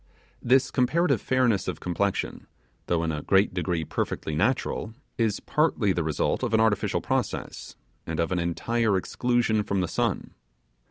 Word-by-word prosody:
This 130 +2 +3
comparative 165 +7 +2
fairness 125 -6 +1
of 90 -4 -3
complexion, 95 +3 -2 0.4
though 85 -1 +1
in 80 - 0
a 75 -1 -3
great 95 +3 +3
degree 85 -2 -1
perfectly 80 - -3
natural, 110 - -1 0.2
is 110 -3 +1
partly 140 -10 +1
the 85 - -1
result 75 -1 0
of 110 - 0
an - - +4
artificial 110 -3 +1
process, - - -3 0.3
and 80 0 -3
of 85 +1 0
an 90 - +1
entire 105 +5 0
exclusion 120 +2 +1
from 100 -2 -1
the 90 - 0
sun. - - -2
100 Hz, 155 wpm, -26 LUFS, 85-120 Hz, 0.4 s, an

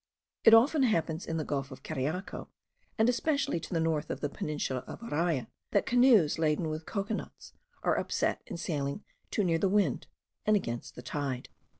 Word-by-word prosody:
It 225 - +9
often 275 +6 +5
happens 165 -9 +1
in 165 - -1
the 155 - -1
gulf 140 -2 -2
of 130 -1 -11
Cariaco, 155 +9 -3 0.5
and 220 0 +4
especially 280 - +1
to 165 - -9
the 170 - +1
north 160 -2 0
of - - -3
the 145 - -2
peninsula 140 -4 -3
of - - -8
Araya, 165 - 0 0.3
that 200 - +3
canoes 240 - +5
laden 155 +1 +1
with 155 +1 -5
cocoa 200 +1 -2
nuts - - -7 0.3
are - - +2
upset - - 0
in - - -5
sailing 145 0 -2 0.3
too 210 - 0
near 165 -3 +2
the 195 - +2
wind, 205 +1 +1 0.4
and 215 - +4
against 120 - -3
the 125 - -9
tide. 135 -4 -3
165 Hz, 185 wpm, -30 LUFS, 145-215 Hz, 0.5 s, It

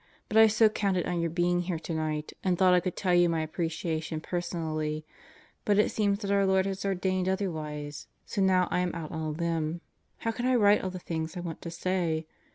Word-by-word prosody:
but 210 - -4
I 220 0 +9
so 220 +1 +5
counted 200 -4 0
on 175 - -1
your 170 - 0
being 175 +1 +1
here 175 -1 -2
tonight 155 -2 -3
and 185 -2 +1
thought 185 0 +5
I 180 - +6
could 180 0 -3
tell 185 -2 0
you 175 -1 +5
my 165 -1 0
appreciation 160 0 -3
personally, 155 -3 -3 0.6
but 205 -1 +2
it 210 - +3
seems 205 -2 +1
that 200 - -1
our 200 0 +4
Lord 190 0 +3
has 195 0 -3
ordained 185 -1 0
otherwise, 155 -6 -3 0.2
so 200 - -2
now 185 -2 +4
I - - +1
am 180 -1 -1
out 160 -2 -5
on 160 - -4
a 155 - -2
limb, 165 +1 -2 0.4
how 225 - -2
can 240 +2 -2
I 255 - +3
write 205 -3 +5
all 190 - -1
the 185 - -6
things 160 -1 -4
I - - -3
want 170 -2 -6
to 170 - -5
say. 170 -2 -1
175 Hz, 220 wpm, -29 LUFS, 160-190 Hz, 0.6 s, I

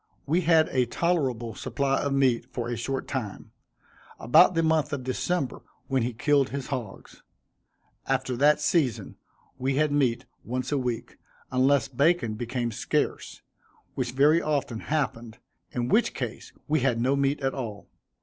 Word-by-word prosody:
We 165 +5 +2
had 160 -2 +4
a 125 -2 +1
tolerable 130 -8 -1
supply 135 +4 -1
of 140 - -1
meat 130 -4 +2
for 120 -1 -4
a 120 - -2
short 130 +3 -3
time, 110 -8 -5 0.7
about 175 +10 +5
the 165 - +2
month 160 -2 +2
of 135 -3 -3
December, 135 +3 -2 0.3
when 135 -1 +1
he 120 +2 -1
killed 140 +3 +2
his 140 -2 -4
hogs. 125 -8 -6 0.9
After 125 - 0
that 145 +4 +4
season 130 - 0 0.4
we 130 +1 0
had 150 +1 +2
meat 130 -4 +1 0.2
once 125 +3 -3
a 145 - +2
week, 125 -3 -4 0.3
unless 130 +2 +3
bacon 140 -2 +1
became 120 +1 -3
scarce, 105 - -2 0.5
which 120 - -3
very 150 +5 +4
often 140 -6 -1
happened, 120 -7 -3 0.3
in 120 -1 -2
which 220 - +2
case - - -5 0.2
we 155 +1 +2
had 125 -3 +1
no 130 +4 +2
meat 140 +1 +1
at 135 0 0
all. 110 -6 -6
135 Hz, 155 wpm, -26 LUFS, 120-145 Hz, 0.9 s, about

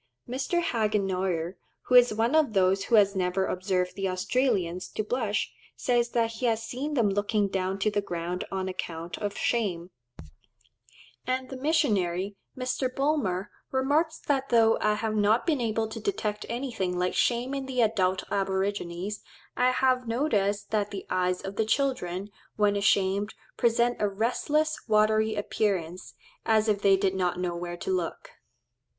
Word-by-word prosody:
Mr. 270 +8 -1
Hagenauer, 190 - 0 0.3
who - - -3
is 245 -1 +7
one 225 +4 +1
of 310 -8 +3
those 190 0 +2
who 235 - +3
has 200 -2 +5
never 185 +1 0
observed 185 -1 -1
the 195 -1 -1
Australians 185 -3 0
to 215 - -3
blush, 215 -2 -1 0.2
says 240 -1 +1
that 230 -1 +1
he 235 +2 -2
has 225 -1 0
"seen 275 +6 -4
them 235 -5 +3
looking 205 +1 +1
down 190 0 -2
to 205 +2 +1
the 205 0 0
ground 175 -1 -3
on 190 -1 -2
account 170 -2 -5
of 205 -1 -3
shame;" 190 -7 -1 1.4
and 255 +1 -2
the - - -4
missionary, 205 - +1 0.2
Mr. 255 0 -1
Bulmer, 255 -9 0 0.2
remarks 290 +5 +1
that 275 -2 -1
though 225 -2 +4
"I 210 0 +2
have 220 0 -2
not 215 +2 +3
been 305 -7 +1
able 225 -1 0
to - - -6
detect 215 - -2
anything 235 -8 -2
like 180 0 0
shame 245 +2 +1
in 275 -1 -3
the 255 -2 0
adult 190 -4 +2
aborigines, 195 0 -2 0.3
I 250 0 +3
have 255 -1 +2
noticed 210 -5 0
that 210 -2 +1
the 195 -2 -6
eyes 180 0 +1
of 195 +1 -6
the 220 - +2
children, 215 -6 -1 0.2
when 205 -1 +2
ashamed, 200 0 +1 0.2
present 235 +1 +2
a 210 - +2
restless, 270 +9 0
watery 215 0 +3
appearance, 190 -4 -2 0.3
as 220 -1 +3
if 205 -2 +1
they 195 -1 +5
did 195 -1 +1
not 180 -2 0
know 180 -1 -2
where 175 0 -5
to 180 - -3
look." 180 -3 -3
210 Hz, 160 wpm, -27 LUFS, 190-245 Hz, 1.4 s, is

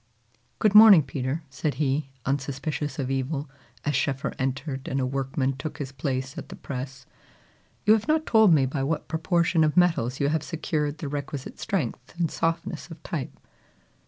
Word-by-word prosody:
"Good 215 -3 +3
morning, 210 -6 +10
Peter," 135 +3 -3
said 145 +1 -2
he, 140 0 0 0.2
unsuspicious 140 +2 -2
of 135 -2 -2
evil, 135 +2 -2 0.4
as 150 -1 +1
Schoeffer 135 +1 -1
entered, 135 +1 -3
and 135 - -1
a 130 - +1
workman 135 0 -1
took 150 +2 -5
his 140 -4 -5
place 135 +2 -3
at - - -10
the - - -8
press. 135 0 -6 0.8
"You 210 - +7
have 220 +2 +1
not 310 0 +2
told 220 -4 +5
me 145 -5 +5
by 135 +1 -2
what 150 +4 -1
proportion 165 0 +2
of 155 +2 +1
metals 160 -8 +3
you 140 - +2
have 155 0 +1
secured 155 -2 -2
the 150 - -5
requisite 140 -1 -5
strength 150 - -3
and 165 -3 +1
softness 165 +1 -2
of 165 -1 -11
type." 150 -6 -4
145 Hz, 170 wpm, -26 LUFS, 135-165 Hz, 0.8 s, morning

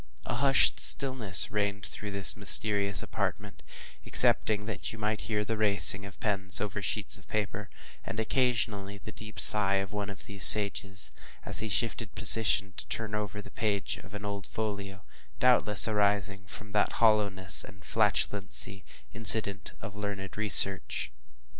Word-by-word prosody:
A - - -6
hushed 135 +2 +1
stillness 130 -9 +4
reigned 100 -1 -4
through 100 +3 -9
this 100 -1 +5
mysterious 100 -2 +3
apartment, 105 0 -7 0.4
excepting 105 -1 +3
that 110 - -8
you 110 - -12
might 105 0 -5
hear 105 -1 -5
the 115 +1 -5
racing 100 -1 +2
of 100 - -17
pens 95 -4 -1
over 105 0 -6
sheets 100 0 -2
of 95 - -23
paper, 105 0 -6 0.3
and 110 - -8
occasionally 110 -4 -3
the 110 - -13
deep 110 0 -12
sigh 100 -2 +2
of 95 +1 -5
one 105 -1 -6
of 100 -2 -12
these 100 -1 -1
sages, 100 -1 +6 0.3
as - - 0
he 110 - -6
shifted 110 -1 -4
his - - -10
position 105 -2 +3
to - - -11
turn 110 -2 -7
over 105 -1 -7
the - - -15
page 105 -4 -4
of 100 +1 -15
an 105 0 -9
old 100 -2 -7
folio; 100 -2 -8 0.3
doubtless 120 -5 +1
arising 100 -2 -3
from 105 +2 -13
that 105 0 -2
hollowness 100 -4 +1
and 100 -2 -16
flatulency 80 +8 -3 0.3
incident 105 -3 +2
to - - -9
learned 100 -1 -9
research. 100 -8 +4
105 Hz, 155 wpm, -26 LUFS, 100-110 Hz, 0.4 s, sages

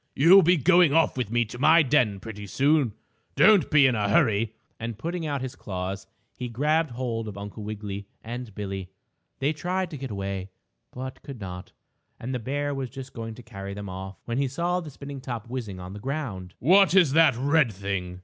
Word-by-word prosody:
You'll 175 +8 +8
be 180 +1 +4
going 170 0 +5
off 165 - +3
with 125 -5 -2
me 120 +1 +2
to 120 +3 -9
my 160 +4 +6
den, 125 -8 +2
pretty 105 -1 -8
soon. 140 +1 +2 0.4
Don't 210 -3 +6
be 150 -2 +6
in 130 - +4
a 105 -3 0
hurry," 110 -6 +2 0.2
and, 115 -1 -5
putting 165 +5 -3
out 140 -3 -2
his 130 - -4
claws, 95 0 -5 0.3
he 125 -1 -5
grabbed 150 +6 +1
hold 120 -2 -3
of 100 -2 -7
Uncle 100 +2 -7
Wiggily 105 -1 -6 0.2
and 120 -2 -7
Billie. 95 -2 -5 0.5
They 140 +3 0
tried 180 +3 -2
to 150 - -6
get 135 -1 -6
away, 100 -2 -4 0.4
but 130 +1 -7
could 135 -5 -9
not, 90 -2 -8 0.5
and 125 +3 -4
the 125 - -1
bear 145 +5 -2
was 135 -2 -4
just 135 0 -9
going 115 -1 -6
to 125 - -12
carry 100 -4 -7
them 100 -1 -6
off, 95 +1 -7
when 120 +2 -2
he 140 - +1
saw 170 +7 -1
the 165 -4 -7
spinning 140 -1 -8
top 120 -4 -5
whizzing 115 -7 -5
on 90 +1 -8
the 105 - -8
ground. 105 -9 -4
"What's 185 0 +5
that 155 -3 +5
red 140 -1 +3
thing?" 95 -2 -4
125 Hz, 200 wpm, -26 LUFS, 100-145 Hz, 0.5 s, You'll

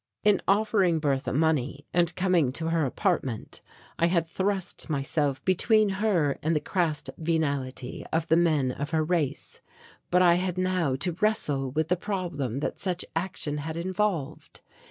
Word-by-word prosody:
In 210 -2 +4
offering 200 -4 +3
Bertha 140 -4 0
money 145 -1 0
and 170 -1 +2
coming 180 -8 +2
to 160 +3 -2
her 165 -3 +1
apartment 135 - -2 0.4
I 170 - +4
had 170 -2 +1
thrust 190 +1 -2
myself 140 -1 -1
between 215 +3 +3
her 170 -10 +1
and 160 +2 +1
the - - +3
crass 165 -2 -1 0.2
venality 140 -6 -2
of 160 0 +1
the 160 - +4
men 155 -6 +2
of 145 +3 -4
her 160 -1 +1
race, 155 -4 -2 0.5
but 180 +1 +4
I 175 -1 +6
had 185 -1 -2
now 185 -7 +1
to 145 +7 -1
wrestle 145 -11 +1
with 155 +4 -1
the 180 - +3
problem 170 - -3
that - - -3
such 185 -2 -2
action 165 -4 -3
had 160 +2 -5
involved. 185 -3 -2
165 Hz, 155 wpm, -27 LUFS, 145-185 Hz, 0.5 s, I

